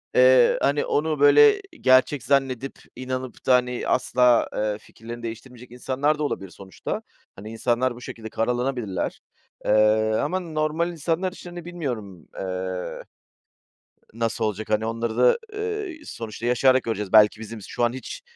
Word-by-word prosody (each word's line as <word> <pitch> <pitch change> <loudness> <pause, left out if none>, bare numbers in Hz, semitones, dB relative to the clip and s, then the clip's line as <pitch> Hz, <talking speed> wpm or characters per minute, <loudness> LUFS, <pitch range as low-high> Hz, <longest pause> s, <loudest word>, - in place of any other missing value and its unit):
eee, 125 -1 +6
hani, 145 +1 +1
onu 155 0 0
böyle 410 - +6 0.2
gerçek 130 +1 +4
zannedip 135 -1 0 0.2
inanıp 130 0 -6
da, 130 - +5
hani, 125 -1 -1
asla, 125 -1 +3
eee, 105 -1 -1
fikirlerini 115 +2 -11
değiştirmeyecek 120 +2 -8
insanlar 135 +4 0
da - - -1
olabilir 95 -10 -3
sonuçta. 95 0 -6 0.3
Hani, 105 +3 -9
insanlar 120 +2 0
bu 120 - -12
şekilde 115 -4 -8
karalanabilirler. 120 -4 -2 0.4
Eee, 110 +1 +3
ama 185 - -1
normal 160 0 -1
insanlar 170 +3 -1
için, 180 - -11
hani, 175 -1 -9
bilmiyorum, 120 - -6
eee, 95 -1 -4 1.1
nasıl 115 0 -1
olacak, 110 0 -3
hani, 110 +1 +1
onları 115 0 -3
da, 125 - +4
eee, 425 -5 -4
sonuçta 115 - -6
yaşayarak 130 +1 +4
göreceğiz. 105 -4 -3
Belki 105 0 +6
bizim 115 0 -8
şu 120 - -2
an 120 - +1
hiç, 130 - -8
125 Hz, 145 wpm, -24 LUFS, 110-145 Hz, 1.1 s, eee